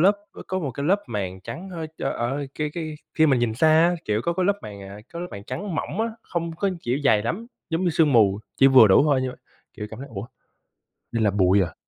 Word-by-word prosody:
lớp, 195 +4 +5 0.2
ơ, - - -10
có 185 - -2
một 150 -7 -3
cái 140 +4 -4
lớp 200 +4 +2
màn 95 -5 -4
trắng, 180 - -7
hơi 165 -3 -5
ơ, - - -1
ở 135 +4 -2
cái 150 -1 -1
cái 160 -2 -4 0.2
khi 160 - +4
mình 135 -4 +3
nhìn 115 -2 0
xa 160 +6 +3
á, 165 +3 +5
kiểu, 105 +1 0
có 170 - +1
cái 185 +1 0
lớp 200 0 +2
màn, 100 -1 -8
à, 100 +1 -9
có 170 - -5
lớp 180 - -4
màn 100 - -8
trắng 190 - -5
mỏng 195 - -3
á, 225 - +1 0.2
không 170 -1 -3
có 195 +2 0
kiểu 125 +3 0
dày 110 -6 +4
lắm, 185 - -3 0.2
giống 165 +3 0
như 175 - +3
sương 155 -3 +3
mù, 100 -4 +4 0.2
chỉ 135 - +6
vừa 130 -4 +8
đủ 95 - +6
thôi 140 -4 +3
như 130 - -2
vậy. - - -11 0.4
Kiểu 105 - -6
cảm 110 - -9
thấy: 140 - -8
"Ủa, 100 +3 -5 0.9
đây 115 - 0
là 105 - +4
bụi 95 0 +3
à?" 85 - -4
140 Hz, 270 wpm, -24 LUFS, 110-170 Hz, 0.9 s, vừa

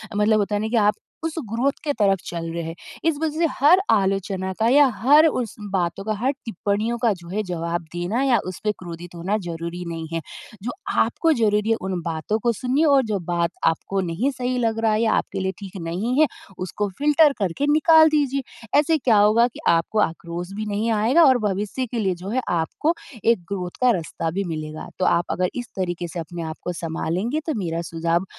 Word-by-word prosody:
मतलब 210 +1 +3
होता 205 0 0
है 205 - 0
ना 220 - -1
कि 235 +2 0
आप - - +1 0.3
उस 325 - -3 0.2
ग्रोथ 245 +5 +2
के 300 - 0
तरफ 195 -2 +3
चल 165 -1 -4
रहे 170 0 -3
हैं। 165 +1 -6 0.3
इस 325 -3 +2
वजह 315 -1 -1
से 340 - +4
हर 305 +7 +6
आलोचना 195 -2 0
का 220 - +3
या 285 +3 +7
हर 295 +6 +6
उस 250 -7 -2 0.2
बातों 185 0 -1
का, 215 - 0
हर 240 +6 0
टिप्पणियों 220 +2 -1
का 230 - +4
जो 170 - -12
है 210 +4 -1
जवाब 170 -2 -3
देना 175 +8 -1
या 255 -4 +3
उसपे 200 +3 -2
क्रोधित 175 0 -9
होना 185 +5 -1
ज़रूरी 170 +1 -5
नहीं 165 -1 -5
है। 165 - -1 0.4
जो 245 - -2 0.3
आपको 330 - +1
ज़रूरी 210 -3 +1
है - - +4
उन 185 -2 -3
बातों 165 +6 -1
को 240 - +3
सुनिए 260 +8 +1
और 280 -3 +5
जो 200 - 0
बात 170 -1 +1 0.2
आपको 190 +4 0
नहीं 220 +12 0
सही 255 -1 -2
लग 225 -2 0
रहा 225 -1 +2
है 215 - +1
या 230 - +3
आपके 195 - -1
लिए 190 0 -1
ठीक 195 -1 -8
नहीं 195 - -1
है, 310 - +6 0.3
उसको 195 +3 -3
फ़िल्टर 295 0 +5
करके 200 +8 -1
निकाल 315 +1 +6
दीजिए। 280 -3 +1 0.4
ऐसे 315 +2 +3
क्या 245 -6 +3
होगा 215 +3 +5
कि 245 - -12
आपको 170 +6 +2
आक्रोश 170 0 -2
भी 215 +1 -3
नहीं 220 +3 0
आएगा 230 +10 +4
और 260 -3 +6
भविष्य 205 +6 -2
के 240 - -2
लिए 190 -4 0
जो 195 - -5
है 255 +4 0 0.2
आपको 295 - 0 0.3
एक 230 -2 +4
ग्रोथ 180 -2 -5
का 250 -1 +5
रास्ता 165 -4 -2
भी 195 +4 -1
मिलेगा। 155 0 -6
तो 185 - +2
आप 170 - +3
अगर 180 0 0
इस 245 -1 -4
तरीके 175 -2 -2
से 170 +1 -6
अपने 170 +1 -6
आप - - -9
को 180 - -3
सँभालेंगे 175 - -1
तो 315 - +1
मेरा 165 -1 -2
सुझाव, 165 +2 0
205 Hz, 215 wpm, -23 LUFS, 175-245 Hz, 0.4 s, या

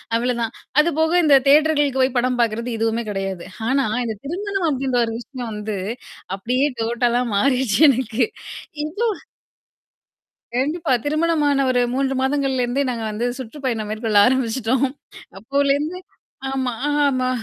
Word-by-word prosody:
அவ்ளதான். 235 -1 -1 0.3
அதுபோக 320 0 +2
இந்த 290 -2 +6
தியேட்டர்களுக்கு 290 -2 +4
போய் 260 0 +1
படம் 250 0 +1
பாார்க்கிறது 230 +1 0
எதுவுமே 225 +1 0
கிடையாது. 195 -3 -3 0.2
ஆனா, 270 +1 +2 0.2
இந்த 220 -2 -3
திருமணம் 390 +4 -2
அப்பிடின்ற 265 -3 0
ஒரு 225 - -4
விஷயம் 245 -1 -7
வந்து 210 0 -4 0.6
அப்பிடியே 250 +8 0
டோட்டலா 240 +1 +1
மாறிருச்சு 255 +1 +2
எனக்கு. 245 -2 +1 0.6
இவ்ளோ 425 +9 -1 1.5
கண்டிப்பா. 300 +4 -1
திருமணமான 300 -2 +2
1 250 -1 +2
3 270 0 0
மாதங்கள்லருந்தே 265 -1 0
நாங்க 235 -2 -3
வந்து 215 +3 -2
சுற்றுப்பயணம் 245 -4 -4
மேற்கொள்ள 215 -1 0
ஆரம்பிச்சுட்டோம். 255 0 +1 0.5
அப்போலருந்து 280 - 0 0.5
ஆமா, 265 -2 -1 0.2
அ - - +1 0.2
ஆமா. 255 -2 +1
260 Hz, 120 wpm, -21 LUFS, 235-285 Hz, 1.5 s, இந்த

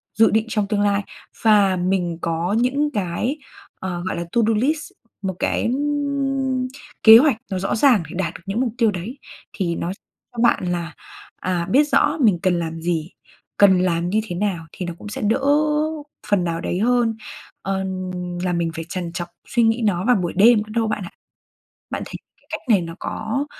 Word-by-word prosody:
dự 225 +1 +5
định 220 0 +2
trong 210 -2 0
tương 205 -1 0
lai, 205 0 +2 0.4
và 205 -4 +5
mình 180 -2 0
có 170 +3 -1
những 280 +5 +1
cái, 205 - -2 0.4
ờ, 175 -2 -4
gọi 185 - -2
là, 170 - -2
to 235 - +3
do 225 - +3
list, 290 +7 0 0.3
một 190 -2 -3
cái 230 - 0 1.3
kế 220 0 +11
hoạch 270 -3 +4
nó 190 - -1
rõ 195 - -1
ràng 230 -5 +4
để - - -8
đạt 170 -3 -1
được - - -11
những 205 +6 -1
mục 235 -4 -1
tiêu 230 -4 +3
đấy, 205 +9 -6 0.4
thì 175 -4 -1
nó 170 - -3 0.4
cho 240 - -7
bạn 235 - +3
là, 170 -2 -4 0.5
à, 175 -2 -1
biết 280 +4 +6
rõ 305 - +3
mình 205 -8 +4
cần 180 -2 +2
làm 165 -1 -4
gì, 165 -1 -2 0.5
cần 190 -3 +6
làm 170 -1 0
như 215 +3 +1
thế 175 - -4
nào, 180 -4 -2
thì 180 - -6
nó 175 - -4
cũng - - -10
sẽ - - -5
đỡ 215 +5 +1 0.9
phần 200 -4 +2
nào 165 -1 -2
đấy 180 - -2
hơn, 235 0 +2 0.5
ờ, 190 0 -2 0.6
là 180 - 0
mình 170 -1 0
phải 165 0 -5
trằn 175 -2 -4
trọc 175 -1 -4 0.2
suy 240 -2 +2
nghĩ 225 +1 +2
nó 185 -1 +1
vào 250 - +5
buổi 175 -3 -1
đêm 230 +4 +6
nữa 215 0 -3
đâu 225 -1 +2
bạn 210 -2 -2
ạ. 175 - -8 0.8
Bạn - - -3
thấy - - -11 0.2
cái - - -33
cách - - -4
này 200 -6 +5
nó 165 0 -6
có 225 +6 -3
195 Hz, 200 wpm, -21 LUFS, 175-225 Hz, 1.3 s, kế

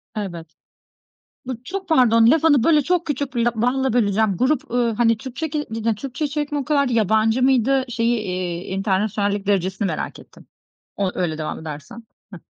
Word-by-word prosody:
Evet. 170 -6 -6 0.9
Bu 250 -2 -5
çok 385 +3 -5
pardon, 230 -6 +5
lafını, 305 -5 +4
böyle, 305 -2 +4
çok 350 +3 0
küçük 285 -2 -3
bir 235 -1 +1
lap 240 - +1
balla 260 +2 +1
böleceğim. 210 -4 +2
Grup, 265 - 0
ııı, 240 -1 +1
hani, 230 0 +3
Türkçe 265 +7 -5
ke 295 0 -2
yine 225 0 -1
Türkçe 270 +6 -5
içerik 295 0 -3
mi 290 - 0
o 275 - -3
kadardı, 280 -4 +1
yabancı 220 +2 +2
mıydı? 265 0 +3
Şeyi, 235 0 0
iii, 180 -3 -4
enternasyonallik 200 0 -1
derecesini 190 0 0
merak - - -4
ettim. - - -17 0.5
O, 195 -2 -1
öyle 165 -4 -1
devam 155 - -4
edersen. 160 +10 -9 0.3
Hıh. 180 - -8
230 Hz, 170 wpm, -21 LUFS, 200-270 Hz, 0.9 s, pardon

